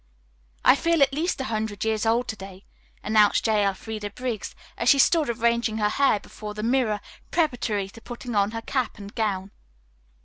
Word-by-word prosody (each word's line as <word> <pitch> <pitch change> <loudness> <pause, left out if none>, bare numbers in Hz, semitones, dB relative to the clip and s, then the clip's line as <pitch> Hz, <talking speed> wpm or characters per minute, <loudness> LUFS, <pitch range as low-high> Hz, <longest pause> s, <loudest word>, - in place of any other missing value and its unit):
"I - - +8
feel 335 0 +3
at 275 0 +2
least 315 +2 -1
a - - -1
hundred 215 -3 -3
years 220 0 0
old 235 +2 +2
to 220 - -3
day," 195 -1 -11 0.4
announced 215 -1 +3
J. 215 -2 +3
Elfreda 205 +2 -3
Briggs, 235 0 -5 0.2
as - - +1
she 280 - +7
stood 310 +1 +4
arranging 235 -1 +1
her 210 -1 +2
hair 270 -2 +3
before 210 0 -9
the 210 - -4
mirror 230 -4 +1 0.3
preparatory 245 - 0
to 230 - -14
putting 240 0 -7
on 200 -1 +2
her 225 +1 -6
cap 255 -3 -2
and 200 0 -10
gown. 200 -3 -2
220 Hz, 180 wpm, -25 LUFS, 210-250 Hz, 0.4 s, I